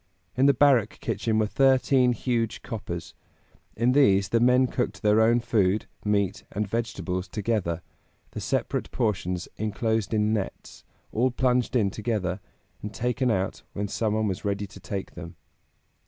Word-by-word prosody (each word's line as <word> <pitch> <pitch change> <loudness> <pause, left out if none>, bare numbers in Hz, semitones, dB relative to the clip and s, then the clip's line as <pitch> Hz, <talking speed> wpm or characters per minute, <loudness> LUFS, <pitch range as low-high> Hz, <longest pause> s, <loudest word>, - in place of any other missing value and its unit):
In 130 +2 +4
the 140 - +6
barrack 125 -6 +3
kitchen 110 -2 -1
were 110 - +3
thirteen 130 +1 +3
huge 115 -2 -2
coppers; 85 -6 -6 0.6
in 120 +3 +3
these 100 -8 +4
the 115 - +2
men 125 +2 +5
cooked 125 -1 -3
their 105 +1 +4
own 115 +2 +4
food, 110 -4 +1 0.2
meat 100 -3 0
and 105 0 -2
vegetables 100 -4 -3
together, 100 -6 -2 0.5
the - - -6
separate - - -1
portions 90 -4 -1
inclosed 110 0 -1
in 105 -1 +2
nets, 100 -3 -5 0.3
all 125 +4 +2
plunged 125 0 +1
in 105 -5 +2
together, 105 -4 -2 0.4
and 105 +1 -7
taken 125 +2 0
out 95 -4 -1
when 100 +1 -2
some 110 +1 -1
one 110 0 +1
was 95 0 -3
ready 100 0 -1
to 100 - -13
take 100 -1 -5
them. 85 -1 -9
110 Hz, 155 wpm, -26 LUFS, 100-120 Hz, 0.6 s, the